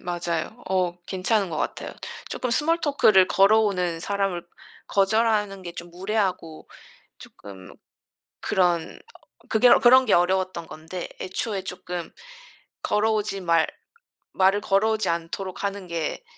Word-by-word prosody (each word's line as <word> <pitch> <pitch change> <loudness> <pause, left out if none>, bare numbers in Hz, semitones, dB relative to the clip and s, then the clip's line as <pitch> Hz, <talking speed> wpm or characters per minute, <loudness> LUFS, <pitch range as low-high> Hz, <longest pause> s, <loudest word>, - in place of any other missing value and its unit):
맞아요. 175 +5 -4
어 185 -2 0
괜찮은 195 +1 0
것 160 - -5
같아요. - - -4 0.4
조금 250 - -3
small 315 +8 +1
talk를 215 -10 +4
걸어오는 195 -4 +3
사람을 195 -2 -2 0.4
거절하는 205 -1 +1
게 175 -1 -7
좀 175 0 -9
무례하고 185 -3 -3 0.5
조금 95 -2 -13 0.7
그런 175 -3 0 0.2
어 - - -16 0.3
그게 225 +3 +5
그런 260 +1 +7
게 220 - +2
어려웠던 185 -1 +1
건데 160 +3 -7
애초에 190 +1 -3
조금 180 -2 -6 0.7
걸어오지 210 -1 0
말 170 -2 +3 0.7
말을 195 +2 +3
걸어오지 215 +1 +1
않도록 170 +3 -4
하는 200 -1 -3
게 165 -3 -3
190 Hz, 285 characters per minute, -24 LUFS, 175-210 Hz, 0.7 s, 그런